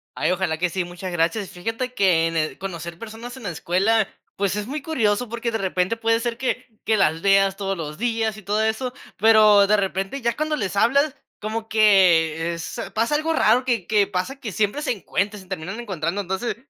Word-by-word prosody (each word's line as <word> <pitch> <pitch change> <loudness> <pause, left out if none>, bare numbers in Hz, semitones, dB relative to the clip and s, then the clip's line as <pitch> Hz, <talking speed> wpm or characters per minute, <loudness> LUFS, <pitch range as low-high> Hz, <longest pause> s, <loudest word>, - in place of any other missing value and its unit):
Ay, - - 0
ojalá 180 -4 0
que 180 +2 0
sí, 185 +1 -2
muchas 175 +1 -7
gracias, 175 +4 0
fíjate 225 +7 -4
que 180 -7 +3
en 165 0 -2
eh, 155 0 -1
conocer 170 -3 -6
personas 230 +4 -9
en 250 - -11
la 190 - -3
escuela, 195 +6 +1 0.3
pues 200 0 0
es 210 - -3
muy 290 +2 -4
curioso 240 -6 0
porque 235 0 -3
de 225 - -1
repente 185 +1 0
puede 225 0 +2
ser 235 0 -3
que 255 0 -2 0.2
que 220 -1 +2
las 160 -4 +2
veas 195 0 +4
todos 195 -1 -2
los 150 -2 -6
días 225 -2 -1
y - - -10
todo 210 +3 0
eso, 235 +3 -1 0.2
pero 215 -2 +6
de 210 - +4
repente 195 +6 -2
ya 235 0 0
cuando 305 0 -1
les 200 -7 -3
hablas 275 +8 +3 0.2
como 220 +1 -4
que 170 -6 +4
es 170 - -6
pasa 230 +6 +1
algo 315 +2 0
raro 245 -4 +3
que 235 -8 0
que 210 -2 +2
pasa 225 +10 -3
que 220 - -5
siempre 210 +9 0
se 305 - -1
encuentra, 205 -1 -2
se 190 - -14
terminan 190 +4 -5
encontrando 190 -3 -3
entonces, 190 +5 -3
205 Hz, 210 wpm, -23 LUFS, 185-230 Hz, 0.3 s, pero